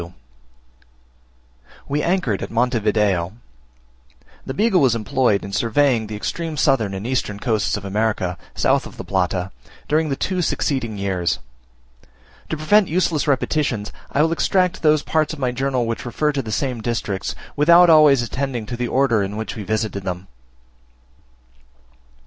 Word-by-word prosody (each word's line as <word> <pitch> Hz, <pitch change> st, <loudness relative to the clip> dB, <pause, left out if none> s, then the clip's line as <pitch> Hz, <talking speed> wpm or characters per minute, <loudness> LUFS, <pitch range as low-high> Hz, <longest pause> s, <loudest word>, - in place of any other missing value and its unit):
We 145 Hz, +2 st, 0 dB
anchored 170 Hz, -, 0 dB
at -, -, -4 dB
Monte 120 Hz, +1 st, +1 dB
Video. 105 Hz, -4 st, +1 dB, 1.1 s
The 130 Hz, -, -3 dB
Beagle 210 Hz, -1 st, +3 dB
was 130 Hz, -4 st, +3 dB
employed 110 Hz, -1 st, +1 dB
in 100 Hz, -, -8 dB
surveying 115 Hz, +2 st, +2 dB
the 105 Hz, -, -6 dB
extreme 160 Hz, +8 st, -4 dB
southern 115 Hz, -11 st, +2 dB
and 95 Hz, +3 st, -6 dB
eastern 120 Hz, -5 st, -2 dB
coasts 110 Hz, -4 st, 0 dB
of 100 Hz, -, -8 dB
America, 100 Hz, -3 st, -1 dB, 0.2 s
south -, -, +1 dB
of -, -, -14 dB
the -, -, -6 dB
Plata, 90 Hz, -1 st, -1 dB, 0.4 s
during 155 Hz, +1 st, +1 dB
the 135 Hz, -, 0 dB
two 185 Hz, +5 st, -1 dB
succeeding 130 Hz, -9 st, -1 dB
years. 95 Hz, -3 st, -1 dB, 1.1 s
To 160 Hz, -, -2 dB
prevent 200 Hz, +6 st, +3 dB
useless 165 Hz, -3 st, 0 dB
repetitions, 135 Hz, -6 st, 0 dB, 0.2 s
I 145 Hz, -, +3 dB
will 160 Hz, -, +1 dB
extract 180 Hz, +2 st, +1 dB
those 155 Hz, -2 st, +3 dB
parts 155 Hz, -1 st, 0 dB
of 155 Hz, -, -8 dB
my 130 Hz, -2 st, 0 dB
journal 130 Hz, -1 st, -1 dB
which 115 Hz, 0 st, -3 dB
refer 150 Hz, +5 st, 0 dB
to 140 Hz, -2 st, -2 dB
the 110 Hz, -4 st, -7 dB
same 125 Hz, -1 st, -2 dB
districts 110 Hz, -4 st, -3 dB, 0.2 s
without 170 Hz, +4 st, +6 dB
always 150 Hz, -6 st, +6 dB
attending 125 Hz, -2 st, -3 dB
to 120 Hz, -, -5 dB
the 120 Hz, 0 st, -2 dB
order 125 Hz, -4 st, +2 dB
in 100 Hz, +1 st, -3 dB
which 110 Hz, -1 st, -4 dB
we 110 Hz, -, -6 dB
visited 110 Hz, 0 st, -2 dB
them. 90 Hz, -1 st, -5 dB
120 Hz, 155 wpm, -21 LUFS, 105-150 Hz, 1.1 s, without